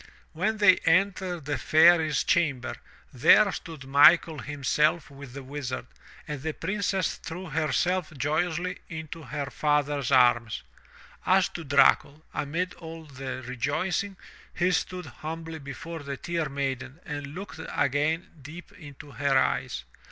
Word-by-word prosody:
When 215 Hz, +7 st, 0 dB
they 205 Hz, -3 st, +6 dB
entered 180 Hz, -1 st, +1 dB
the 145 Hz, 0 st, -2 dB
Fairy's 160 Hz, -2 st, +5 dB
chamber, 140 Hz, -7 st, 0 dB, 0.4 s
there 200 Hz, -, +6 dB
stood 165 Hz, -5 st, -8 dB
Michael 150 Hz, +3 st, +5 dB
himself 150 Hz, +3 st, 0 dB
with 140 Hz, -2 st, -11 dB
the 140 Hz, 0 st, -7 dB
Wizard, 130 Hz, -2 st, -5 dB, 0.4 s
and 150 Hz, -3 st, -5 dB
the 160 Hz, +2 st, -3 dB
Princess 195 Hz, +1 st, -1 dB
threw 170 Hz, +1 st, -8 dB
herself 160 Hz, +4 st, 0 dB
joyously 175 Hz, +5 st, -1 dB
into 160 Hz, 0 st, -7 dB
her 145 Hz, -2 st, -5 dB
father's 145 Hz, -3 st, 0 dB
arms. 120 Hz, -, +3 dB, 0.6 s
As 185 Hz, 0 st, +3 dB
to 170 Hz, -, -7 dB
Dracul, 140 Hz, +1 st, +3 dB
amid 165 Hz, +5 st, -2 dB
all 165 Hz, -1 st, -10 dB
the 135 Hz, -2 st, -7 dB
rejoicing, 155 Hz, +10 st, -2 dB, 0.3 s
he 180 Hz, +1 st, +1 dB
stood 180 Hz, +1 st, -2 dB
humbly 160 Hz, +1 st, -7 dB
before 145 Hz, +4 st, -7 dB
the 140 Hz, -1 st, -5 dB
Tear 165 Hz, -2 st, -2 dB
Maiden 135 Hz, 0 st, -4 dB
and 145 Hz, -1 st, -6 dB
looked 195 Hz, -2 st, -8 dB
again 150 Hz, +6 st, 0 dB
deep 160 Hz, +7 st, -11 dB
into 145 Hz, -7 st, -12 dB
her 140 Hz, -1 st, +1 dB
eyes. -, -, 0 dB
155 Hz, 130 wpm, -27 LUFS, 140-175 Hz, 0.6 s, they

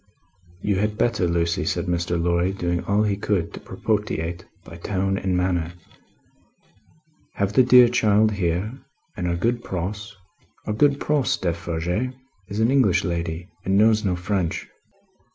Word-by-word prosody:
"You 100 Hz, -2 st, +1 dB
had 105 Hz, +1 st, -1 dB
better, 110 Hz, -7 st, +1 dB
Lucie," 85 Hz, 0 st, 0 dB
said -, -, -1 dB
Mr. 85 Hz, -1 st, -1 dB
Lorry, 85 Hz, +2 st, +1 dB
doing 85 Hz, -2 st, -2 dB
all 100 Hz, +2 st, +2 dB
he 105 Hz, -2 st, +1 dB
could 100 Hz, -4 st, -1 dB
to -, -, -7 dB
propitiate, 90 Hz, -6 st, -2 dB, 0.2 s
by 85 Hz, -, -10 dB
tone 95 Hz, +1 st, -1 dB
and 95 Hz, -1 st, -1 dB
manner, 90 Hz, -2 st, 0 dB, 1.6 s
"have 100 Hz, 0 st, -1 dB
the 130 Hz, -, +6 dB
dear 125 Hz, -1 st, +7 dB
child 110 Hz, -3 st, +3 dB
here, 95 Hz, +2 st, -1 dB, 0.4 s
and 90 Hz, -5 st, -3 dB
our 85 Hz, -, 0 dB
good 120 Hz, +6 st, -1 dB
Pross. 100 Hz, +3 st, -5 dB, 0.5 s
Our 105 Hz, -, -2 dB
good 140 Hz, +5 st, +3 dB
Pross, 140 Hz, -3 st, +1 dB
Defarge, 85 Hz, +7 st, -2 dB, 0.3 s
is 100 Hz, +2 st, -5 dB
an 115 Hz, +3 st, +3 dB
English 130 Hz, -10 st, +3 dB
lady, 85 Hz, -1 st, -3 dB, 0.2 s
and 95 Hz, +1 st, +1 dB
knows 110 Hz, 0 st, +4 dB
no 95 Hz, -3 st, +1 dB
French." 90 Hz, -1 st, -2 dB
95 Hz, 150 wpm, -23 LUFS, 85-110 Hz, 1.6 s, dear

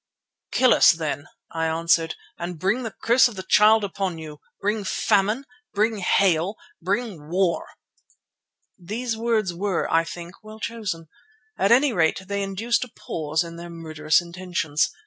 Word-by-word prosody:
"Kill 255 Hz, -2 st, +5 dB
us -, -, +7 dB
then," 155 Hz, -4 st, -3 dB, 0.2 s
I 165 Hz, 0 st, -1 dB
answered, 165 Hz, 0 st, +1 dB, 0.2 s
"and 175 Hz, 0 st, -5 dB
bring 195 Hz, +9 st, 0 dB
the 225 Hz, -4 st, -6 dB
curse 245 Hz, +3 st, +6 dB
of 240 Hz, -, -9 dB
the 190 Hz, -, -6 dB
Child 215 Hz, +2 st, +6 dB
upon 190 Hz, -3 st, -2 dB
you. 155 Hz, -2 st, -9 dB, 0.2 s
Bring 210 Hz, +1 st, -1 dB
famine, 210 Hz, +6 st, +1 dB, 0.3 s
bring 215 Hz, +1 st, +1 dB
hail, 185 Hz, 0 st, +2 dB, 0.3 s
bring 190 Hz, -4 st, -3 dB
war!" 180 Hz, 0 st, +1 dB, 1.1 s
These 225 Hz, +6 st, -3 dB
words 220 Hz, -5 st, 0 dB
were, 190 Hz, 0 st, -1 dB
I 165 Hz, 0 st, +4 dB
think, 170 Hz, +3 st, -9 dB
well 215 Hz, 0 st, -11 dB
chosen; 210 Hz, -8 st, -4 dB, 0.5 s
at 195 Hz, +3 st, +1 dB
any 260 Hz, +2 st, +5 dB
rate 170 Hz, +1 st, +1 dB
they 200 Hz, 0 st, -2 dB
induced 215 Hz, +5 st, 0 dB
a 250 Hz, -, -9 dB
pause 155 Hz, -5 st, -2 dB
in 170 Hz, 0 st, -9 dB
their 170 Hz, 0 st, -8 dB
murderous 160 Hz, -1 st, 0 dB
intentions. 170 Hz, -3 st, -1 dB
190 Hz, 150 wpm, -24 LUFS, 165-215 Hz, 1.1 s, us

